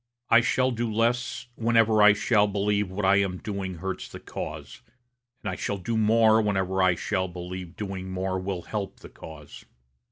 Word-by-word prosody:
I 115 - +7
shall 130 +1 +1
do 120 -1 -2
less 115 +2 0
whenever 115 -2 +3
I 105 -1 +8
shall 105 0 +2
believe 100 0 0
what 95 +1 -3
I 100 +1 +5
am 95 -2 0
doing 95 -2 -5
hurts 95 +2 -5
the - - -10
cause, - - -7 0.6
and - - -2
I - - -4
shall 100 - -3
do 115 +5 -3
more 110 0 +4
whenever 95 -2 0
I 95 -1 +4
shall 95 +2 -1
believe 90 0 -7
doing 95 -2 -5
more 95 0 -2
will 95 -2 -4
help 105 -3 -5
the - - -11
cause. 80 -2 -12
100 Hz, 180 wpm, -26 LUFS, 95-110 Hz, 0.6 s, I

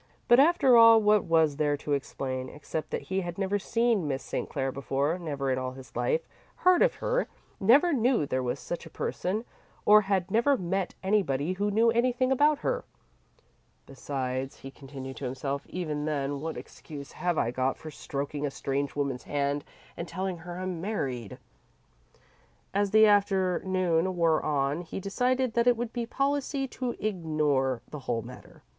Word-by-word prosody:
But 240 0 +7
after 285 -4 +5
all 230 -1 +9
what 210 -1 +3
was 160 -3 +3
there 145 -1 +1
to 145 +1 -3
explain, 130 -2 -3
except 155 +2 -5
that - - -3
he 190 +1 -2
had 175 -1 -6
never 200 +1 0
seen 230 -4 +1
Miss 135 -1 -2
St. - - -4
Clair 135 -2 -2
before, 140 +5 -1
never 140 -5 -2
in 130 - 0
all 130 0 -4
his 130 0 -13
life 485 0 0 0.3
heard 365 -1 +4
of - - +4
her, - - 0 0.3
never 275 - +5
knew 245 - +2
there 130 -1 -1
was 125 -1 -2
such 175 - -6
a - - -11
person, 210 +6 -3 0.4
or 210 0 +8
had 195 -2 -1
never 250 +6 +3
met 185 -1 -2
anybody 185 -6 +1
who 205 +2 -1
knew 225 +3 +3
anything 250 +2 +1
about 290 +3 +4
her? - - 0 1.0
"Besides," 130 -1 -4
he 135 - -8
continued 135 -1 -9
to 140 - -5
himself 135 +2 -3
"even 155 -5 -3
then, 140 -2 -2
what 160 +1 -4
excuse 140 -3 -10
have 175 -2 -1
I 120 - +1
got 130 +2 0
for 155 -1 -9
stroking 145 0 -4
a 145 - 0
strange 140 +1 -3
woman's 140 -3 -2
hand 145 0 -1 0.3
and 170 - -5
telling 185 +1 -3
her 175 +1 -8
I'm 185 -2 -4
married?" 135 - -3 1.4
As 200 0 +1
the 220 +2 +6
afternoon 185 -3 +2
wore 165 -2 +3
on, 145 +2 0
he 175 - -6
decided 250 +5 0
that 235 +1 +2
it 245 -2 +5
would 235 -1 -4
be 235 -1 -3
policy 275 +1 -1
to 250 -2 -3
ignore 150 - 0
the 150 - -6
whole 120 -4 -2
matter. 125 +2 -13
175 Hz, 175 wpm, -28 LUFS, 140-220 Hz, 1.4 s, all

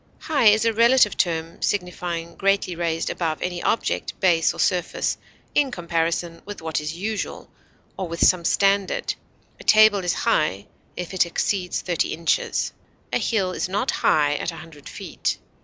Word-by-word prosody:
High 290 -6 +1
is 215 +2 +5
a 230 - +2
relative 235 0 +4
term 165 -2 -1
signifying 175 -3 -2
greatly 195 -2 0
raised 165 -1 -1
above 160 -3 -2
any 180 -1 -3
object, 230 - -1
base, 170 -4 +3
or - - -10
surface, 180 -2 0 0.4
in 285 -2 +3
comparison 170 -3 -2
with 205 0 -8
what 160 -1 -2
is 150 +2 -5
usual, 210 +3 -4 0.5
or 190 - -3
with 170 0 +1
some 180 -2 +3
standard; 195 +2 +1 0.5
a - - -11
table 215 -1 +6
is 175 - +1
high 100 -10 +1 0.3
if 180 +1 -5
it 180 -2 +2
exceeds 180 +1 -1
thirty 175 -3 -1
inches; 165 0 0 0.4
a - - +2
hill 195 -5 0
is 185 - -3
not 205 +7 0
high 145 -1 +3
at - - -3
a - - -10
hundred 160 -3 -12
feet. - - -3
180 Hz, 160 wpm, -23 LUFS, 165-200 Hz, 0.5 s, table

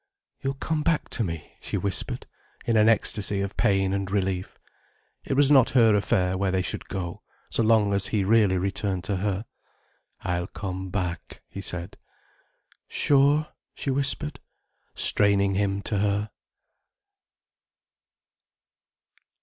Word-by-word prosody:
"You'll 135 0 -2
come 155 +2 -2
back 165 0 0
to 115 - -1
me," 85 -5 -6
she - - -3
whispered, 100 -2 -2 0.4
in 115 - +1
an 110 0 +5
ecstasy 105 -2 +1
of 100 0 -4
pain 95 -1 +2
and 100 -1 -2
relief. 95 -2 -2 0.7
It - - -2
was 140 +1 +4
not 135 -4 +6
her 115 -3 +6
affair, 95 -2 +1
where 100 -1 +1
they 95 0 0
should - - -4
go, 90 -3 -5 0.3
so - - +1
long 110 -2 +3
as 100 0 +2
he 105 -3 0
really 105 -2 +4
returned 95 0 -1
to 95 +1 -1
her. 100 +2 -2 0.8
"I'll 90 +1 -2
come 95 -1 -5
back," 90 -3 -4
he 100 - -7
said. 90 -2 -4 0.9
"Sure?" 145 +2 +3 0.3
she 140 - -2
whispered, 140 +1 0 0.6
straining 100 -1 +3
him 100 0 0
to 105 - -1
her. 105 0 0
100 Hz, 135 wpm, -26 LUFS, 95-115 Hz, 0.9 s, not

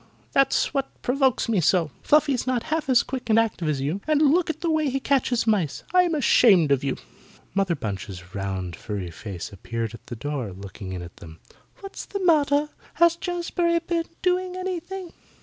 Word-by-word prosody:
That's 275 +1 +2
what 275 -1 -3
provokes 265 0 +2
me 215 -6 +2
so. 165 -2 +2
Fluffy's 285 -4 +2
not 250 -2 0
half 315 -3 -1
as 250 -2 +5
quick 255 -2 -6
and 220 - +5
active 220 -8 +1
as 140 -3 -1
you, 155 +9 -2
and 305 -2 +3
look 310 +4 +3
at 315 0 -3
the 335 -1 0
way 310 -2 +1
he 270 +1 -1
catches 260 -4 +1
mice. 200 -10 0
I'm 360 -3 +4
ashamed 205 - +5
of 140 -1 +2
you." 135 - -1 0.6
Mother 195 -3 +1
Bunch's 95 - -6
round 95 -3 -3
furry 100 -3 -5
face 95 +1 -7
appeared 115 +3 -4
at 115 - -13
the 120 - -6
door 125 -4 -4
looking 95 0 -8
in 90 -1 -5
at 85 - -12
them. 80 -1 -12 0.4
"What's 390 -1 -7
the 395 -2 -4
matter? 295 -3 +3 0.3
Has 340 +1 +5
Jazbury 345 0 0
been 335 0 -1 0.2
doing 365 0 +1
anything?" 370 0 -5
245 Hz, 185 wpm, -24 LUFS, -, 0.6 s, as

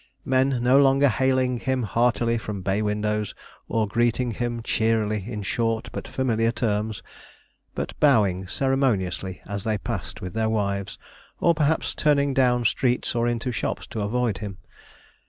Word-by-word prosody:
Men 130 -1 +2
no 130 +3 +5
longer 135 +1 +5
hailing 130 0 +1
him 130 0 -1
heartily 115 +2 +1
from 105 -3 -5
bay 100 +3 0
windows, 105 -1 -1 0.3
or 110 -2 0
greeting 120 +3 +1
him 120 +1 -3
cheerily 110 -3 0
in 105 -3 -4
short 115 +2 -1
but - - -6
familiar 115 -3 +1
terms, 110 -2 -2 0.7
but - - -3
bowing 100 -10 +3
ceremoniously 100 -8 0
as 100 -1 -5
they 110 -1 0
passed 95 - -5
with 90 -1 -6
their 110 0 0
wives, 100 -2 -2 0.4
or 170 - +4
perhaps 155 0 0
turning 140 -2 +2
down 125 -2 +2
streets 125 +3 +1
or 120 -1 +1
into 120 +1 -1
shops - - -3
to 110 - -5
avoid 110 -1 0
him. 100 -2 -6
115 Hz, 150 wpm, -24 LUFS, 105-130 Hz, 0.7 s, no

